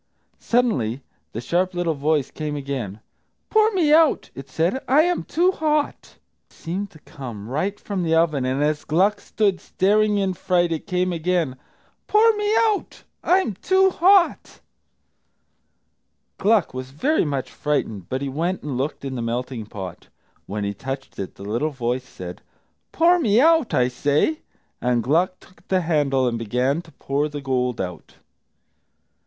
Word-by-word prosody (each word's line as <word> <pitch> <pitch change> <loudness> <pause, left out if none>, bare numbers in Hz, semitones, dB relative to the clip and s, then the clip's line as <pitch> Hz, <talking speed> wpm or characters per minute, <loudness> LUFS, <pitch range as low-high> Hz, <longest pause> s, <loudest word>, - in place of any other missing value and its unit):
Suddenly 140 - 0 0.3
the 115 - -5
sharp 180 +7 0
little 175 -2 0
voice 150 -1 0
came 150 -1 -4
again. 130 -8 -4 0.5
"Pour 435 0 +5
me 320 -6 +3
out," 320 -1 +4
it 135 0 -10
said, 170 - 0
"I 290 +4 +5
am 350 0 0
too 355 +4 +2
hot!" 305 -4 -1 0.3
It - - -26
seemed 190 +4 -4
to 155 - -17
come 115 -7 -8
right 185 - -2
from 200 -3 -3
the 165 -1 +1
oven, 160 -5 +2
and 130 +3 0
as 150 0 0
Gluck 190 +7 +2
stood, 200 -4 0
staring 210 +2 +2
in 195 -2 0
fright, 175 -1 +1
it 160 - -3
came 180 0 0
again, 165 -4 0 0.5
"Pour 440 +1 +5
me 420 0 0
out; 435 -3 0 0.2
I'm 365 - +2
too 375 - +3
hot!" 365 +1 +3 1.8
Gluck 210 -2 +2
was 130 0 -6
very 270 - +1
much 140 -5 -3
frightened, 110 - -2
but 130 +2 -2
he - - -2
went 165 +7 -2
and 135 -4 -3
looked 140 +1 -3
in 135 - -4
the 125 - -3
melting 115 -1 -3
pot. 95 -4 -8 0.4
When 105 +1 -3
he 100 0 -2
touched 135 +6 -7
it, 95 - -5
the - - -11
little 115 +9 -1
voice 125 -2 -3
said, 90 -1 -8 0.5
"Pour 345 +2 +4
me 220 -8 +3
out, 320 -1 +4
I 125 -1 +3
say!" 145 - +1 0.4
And 125 -2 +1
Gluck 175 - +1
took 180 0 -22
the 185 -1 +2
handle 145 -6 +1
and 115 -1 -1
began 125 +7 0
to 170 -2 -18
pour 140 +2 -1
the 145 0 -6
gold 125 -3 -1
out. 90 -3 -6
155 Hz, 160 wpm, -23 LUFS, 130-210 Hz, 1.8 s, Pour